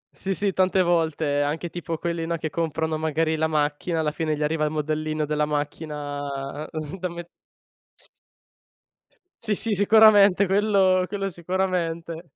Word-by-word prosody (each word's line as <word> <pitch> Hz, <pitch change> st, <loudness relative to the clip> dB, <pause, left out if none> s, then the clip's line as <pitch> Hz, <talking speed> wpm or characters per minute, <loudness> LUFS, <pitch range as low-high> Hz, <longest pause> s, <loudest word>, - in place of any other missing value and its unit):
Sì, 195 Hz, -1 st, -3 dB
sì, 200 Hz, +1 st, -1 dB
tante 185 Hz, 0 st, +3 dB
volte 160 Hz, -4 st, +1 dB
anche 155 Hz, +4 st, -2 dB
tipo 170 Hz, -2 st, -4 dB
quelli 170 Hz, -1 st, -3 dB
no, 170 Hz, 0 st, -1 dB
che 155 Hz, -1 st, -4 dB
comprano 160 Hz, -1 st, -1 dB
magari 160 Hz, 0 st, 0 dB
la 160 Hz, +1 st, +1 dB
macchina 155 Hz, +2 st, -1 dB
alla 150 Hz, -1 st, 0 dB
fine 155 Hz, -1 st, -2 dB
gli 150 Hz, -, -2 dB
arriva 155 Hz, +1 st, 0 dB
il 150 Hz, -, +1 dB
modellino 155 Hz, 0 st, -2 dB
della 150 Hz, 0 st, 0 dB
macchina 145 Hz, -1 st, -4 dB, 0.3 s
da 180 Hz, 0 st, -2 dB
me 170 Hz, 0 st, -7 dB, 2.2 s
Sì, 210 Hz, -, +1 dB
sì, 220 Hz, +1 st, -2 dB
sicuramente 205 Hz, -1 st, +6 dB
quello 195 Hz, -2 st, +3 dB
quello 195 Hz, +1 st, -3 dB
sicuramente. 170 Hz, -2 st, -2 dB
165 Hz, 140 wpm, -24 LUFS, 150-185 Hz, 2.2 s, sicuramente